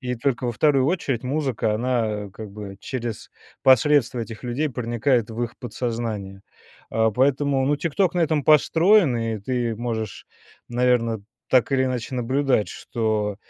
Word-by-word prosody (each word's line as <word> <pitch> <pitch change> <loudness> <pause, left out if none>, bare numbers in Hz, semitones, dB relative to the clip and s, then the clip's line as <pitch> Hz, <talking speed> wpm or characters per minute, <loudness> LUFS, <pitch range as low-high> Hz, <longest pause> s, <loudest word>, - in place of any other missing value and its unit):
И 125 -2 -3
только 125 0 -1
во 120 - -1
2 135 +2 +3
очередь 145 -7 -1
музыка, 130 -5 -1
она 110 -4 -1
как 110 -2 -9
бы 100 -1 -8
через 120 -4 -5 0.3
посредство 130 -1 +4
этих 115 0 -6
людей 125 +5 -1
проникает 120 -1 0
в 110 - -5
их 120 - -9
подсознание. 115 -6 -4 0.5
А 110 0 +2
поэтому, 135 +2 +2
ну, 145 - +2
"Тикток" 170 +5 0
на - - 0
этом 155 -3 +1
построен, 160 - +4
и 115 -1 -2
ты 120 +1 -2
можешь, 110 -2 -4 0.4
наверно, 120 -3 +1 0.3
так 130 +1 +3
или 130 -1 +2
иначе 130 0 -3
наблюдать, 130 -2 +1
что, 110 -3 -2
125 Hz, 145 wpm, -23 LUFS, 110-135 Hz, 0.5 s, посредство